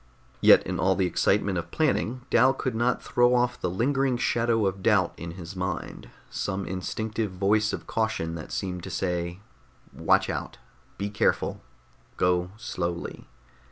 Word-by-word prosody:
Yet - - +7
in - - -3
all 95 0 +3
the 95 - +1
excitement 95 +1 +1
of 85 0 -7
planning, 130 - 0
Dal 130 +3 +5
could 130 -2 -2
not 120 +2 0
throw 120 0 +3
off 125 0 +1
the 90 - 0
lingering 130 +6 +1
shadow 115 -2 +1
of 95 0 -1
doubt 100 -4 +3
in 85 0 -7
his 90 +1 -9
mind, 90 -1 -4 0.2
some 95 +1 -2
instinctive 110 +4 -3
voice 105 +4 +2
of - - -5
caution 110 -7 -1
that 80 -2 -7
seemed 90 -2 -3
to 95 - -7
say 90 0 -2 0.5
_watch - - +3
out, - - -4 0.4
be 100 +1 -3
careful, 100 - 0 0.6
go 90 0 +2
slowly! 85 -6 -4
100 Hz, 155 wpm, -26 LUFS, 90-115 Hz, 0.6 s, Yet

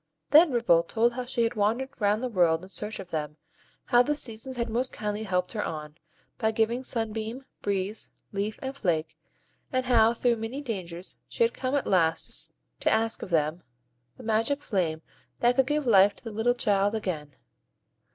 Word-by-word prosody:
Then 315 +1 +8
Ripple 235 -9 +4
told 230 +7 +1
how 250 0 -4
she 245 -1 0
had 230 - +1
wandered 240 +5 -1
round 210 +3 +2
the - - +1
world 175 -7 +2
in 185 - -10
search 210 +4 -5
of 180 - -9
them, 150 -1 -3 0.5
how 245 - +5
the 295 +4 +1
Seasons 255 -1 -4
had 235 0 -1
most 245 +3 0
kindly 210 0 -3
helped 180 -2 0
her 210 - -1
on, 150 -2 -5 0.5
by 220 - +2
giving 225 +3 0
Sun 225 -4 -2
beam, 225 +4 -5 0.2
Breeze, 200 +1 -2 0.2
Leaf, 205 +2 -2
and 265 +1 -4
Flake; 165 - -1 0.6
and 255 -2 0
how, 230 -2 +4
through 240 0 +2
many 225 +5 -4
dangers, 185 -9 -6
she 475 - +1
had 460 - +2
come 260 +1 -2
at 285 - 0
last 165 -3 +1 0.3
to - - +2
ask 225 0 +1
of - - -6
them 160 0 +1 0.6
the - - -11
magic 230 +6 0
flame 165 -6 -1 0.4
that 240 +1 +3
could 265 -1 +3
give 295 0 0
life 200 -3 +6
to - - -22
the 225 - -6
little 225 +3 +1
child 205 -2 +2
again. 155 -10 -4
220 Hz, 190 wpm, -27 LUFS, 185-245 Hz, 0.6 s, Then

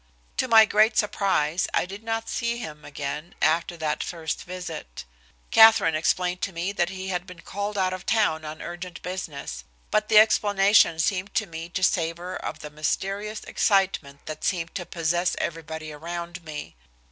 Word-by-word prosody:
To 260 - +1
my 225 -2 +8
great 215 +2 +3
surprise, 185 -6 +1
I - - +2
did 195 +3 -9
not 225 0 -2
see 235 -1 -1
him 150 -10 -7
again 145 +3 -5
after 170 +2 +1
that 155 -2 -1
first 160 -3 -4
visit. 175 - -7 0.5
Katherine 220 -7 +7
explained 180 +3 0
to 200 - -1
me 175 +3 -2
that 175 -3 0
he 190 0 -6
had 180 0 -2
been 180 -3 -11
called 205 +3 -4
out 185 -1 +1
of 185 0 -7
town 180 -8 +2
on 155 0 -7
urgent 175 0 -7
business, 150 - -5 0.3
but 215 0 +1
the 220 - +6
explanation 205 -4 +5
seemed 185 +4 -1
to 215 - +2
me 165 -2 -7
to 185 +1 -3
savor 170 +1 0
of - - -5
the 150 - -8
mysterious 195 +7 -2
excitement 190 -8 +1
that 155 -1 -7
seemed 170 -2 -1
to 180 -3 -5
possess 175 +1 0
everybody 160 -1 -4
around 170 +3 -6
me. 155 - -7
180 Hz, 170 wpm, -25 LUFS, 160-200 Hz, 0.5 s, my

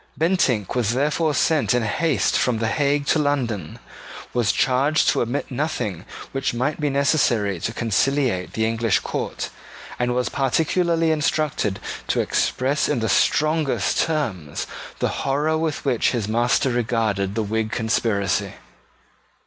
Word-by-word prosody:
Bentinck 150 - +1
was 120 -3 +1
therefore 150 +3 +1
sent 150 -3 +2
in 125 - +1
haste 155 +9 +1
from 125 -3 +2
the 110 0 0
Hague 145 +2 +1
to 155 - +2
London, 120 - -1 0.6
was 120 -5 +2
charged 135 +7 +2
to - - +2
omit 120 +4 -2
nothing 120 - -3 0.3
which 135 -2 -2
might 130 +7 -1
be 150 - +1
necessary 125 - +1
to 105 - -2
conciliate 120 -2 0
the 110 - 0
English 115 -2 +1
court, - - -4 0.5
and 120 0 0
was 125 0 0
particularly 165 +4 +1
instructed 150 -9 0 0.3
to - - +1
express 135 +3 0
in 145 - +1
the 110 -1 -1
strongest 145 - +2
terms 110 - -2 0.3
the - - 0
horror 145 +3 +1
with 160 -2 -2
which 130 -3 +2
his 115 -5 -1
master 120 +4 +2
regarded 110 -5 0
the 110 - 0
Whig 110 +1 -2
conspiracy. 110 -3 0
125 Hz, 140 wpm, -22 LUFS, 110-150 Hz, 0.6 s, sent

